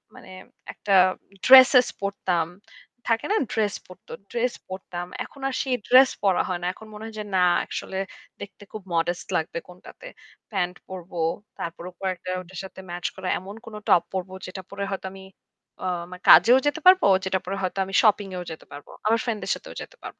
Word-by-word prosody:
মানে - - -13 0.4
একটা 205 - -2 0.5
ড্রেসেস 260 -1 +9
পড়তাম। 185 -4 -1 0.7
থাকে 225 - -2
না - - +3 0.2
ড্রেস 210 -2 0
পড়ত। 185 - -16 0.2
ড্রেস 240 +1 0 0.2
পড়তাম। 180 -2 -6 0.2
এখন 275 - -15
আর - - -5
সেই 260 -2 0
ড্রেস 260 +1 +7
পরা 190 -3 +3
হয় 180 -1 -2
না। 175 - -2
এখন 220 +3 -14
মনে 210 +1 -9
হয় 225 -1 -9
যে - - -3
না 185 - +4 0.2
আসলে 190 - -5 0.4
দেখতে 205 0 -10
খুব 215 - -6
modest 170 +1 -1
লাগবে, 160 +1 -3
কোনটাতে। 180 - -13 0.4
প্যান্ট 180 -3 -1
পরব। 185 -2 -9 0.5
তারপর 170 0 -6
ওপর 185 - -10
একটা 185 +1 -9
ওইটার 185 0 -9
সাথে 190 - -12
ম্যাচ 175 0 -6
করা 190 -1 -6
এমন 195 +3 -10
কোন 225 -2 -9
টপ 170 - +6
পড়ব 185 -1 -3 0.2
যেটা 185 +1 -7
পরে 200 0 -4
হয়তো 195 - -4
আমি 190 - -11 0.6
অ - - 0 0.2
আমার 180 0 -10
কাজেও 245 +3 +9
যেতে 290 +3 0
পারব। 370 0 +8 0.2
যেটা 190 0 0
পরে 195 +2 -3
হয়তো 185 +1 -2
আমি 195 - -9
শপিং 210 -2 +3
এও 180 - -4
যেতে 160 - -9
পারব। 145 0 -10 0.2
আমার 225 +1 +3
ফ্রেন্ডসদের 225 -4 -1
সাথেও - - -11
যেতে - - -10
পারব। - - -9
190 Hz, 185 wpm, -25 LUFS, 180-225 Hz, 0.7 s, ড্রেসেস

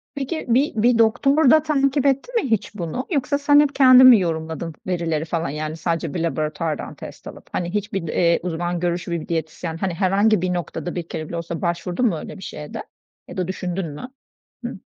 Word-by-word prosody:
Peki 285 +3 -4
bir 260 +4 +2
bir 240 -1 +4
doktor 250 +6 +4
da 310 -1 +5
takip 280 -2 +1
etti 275 - +1
mi 385 - 0
hiç 215 -1 -1
bunu? 180 +7 -4
Yoksa 285 -2 +1
sen 290 0 +5
hep 290 -1 +2
kendin 255 -1 +8
mi 240 -4 +9
yorumladın 160 -2 -3
verileri 165 -3 -1
falan? 165 -1 -2
Yani 155 +2 -4
sadece 165 -2 -2
bir - - -2
laboratuvardan 155 -1 -2
test - - -11
alıp, - - -11
hani 175 0 -3
hiçbir, 205 -4 -2
eee, 170 +1 +2
uzman 175 0 -2
görüşü 175 0 -2
bir 170 -2 -3
diyetisyen 165 0 -3
hani 185 0 -2
herhangi 200 +2 +2
bir 180 0 0
noktada 175 0 -4
bir 175 -2 -4
kere 155 -2 -5
bile 170 - -5
olsa 170 0 -5
başvurdun 175 +5 -1
mu 205 -8 +2
öyle 155 - -8
bir 190 - -11
şeye 150 -1 -8
de - - -5 0.4
ya - - -10
da 180 - -1
düşündün 185 0 -3
mü? 200 - -8 0.6
Hıh. - - -3
180 Hz, 200 wpm, -22 LUFS, 165-250 Hz, 0.6 s, mi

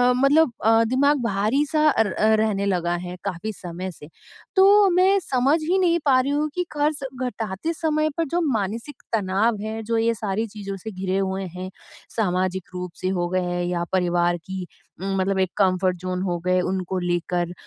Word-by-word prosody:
मतलब 275 +1 +4
अ, 225 0 +5
दिमाग 270 +4 +2
भारी-सा 275 +9 +2
र 210 -5 +2 0.3
रहने 205 -2 0
लगा 175 -3 0
है 180 - -6
काफ़ी 200 +2 -3
समय 180 0 -6
से। 150 -3 -13 0.5
तो 400 +1 +6
मैं 370 +2 +4
समझ 270 +4 +2
ही 350 +5 +1
नहीं 340 -2 +3
पा 265 -3 +5
रही 275 +2 -2
हूँ 300 +1 0
कि 360 0 -1
कर्ज़ 295 -1 0 0.2
घटाते 225 - -3
समय 310 -1 0
पर 330 - +1
जो 350 - +2
मानसिक 225 +7 -4
तनाव 210 +2 +1
है 220 +1 -4
जो 230 +1 -1
ये 230 +1 +2
सारी 215 +1 -2
चीज़ों 205 -1 -9
से 220 +4 -7
घिरे 190 0 -2
हुए 195 0 -1
हैं, 185 +1 -5 0.5
सामाजिक 185 -3 -1
रूप 180 -1 -5
से 185 - -1
हो 175 -1 0
गए 185 +1 0
हैं 175 0 -2
या 175 -1 -1
परिवार 175 -1 +2
की 190 -2 -5 0.3
उम, 195 0 -2
मतलब 190 +1 0
एक 190 -1 +2
कम्फर्ट 185 -2 +2
ज़ोन 185 0 -3
हो 175 -2 -1
गए 185 0 +3
उनको 185 0 -2
लेकर, 175 0 -1
200 Hz, 185 wpm, -23 LUFS, 185-275 Hz, 0.5 s, तो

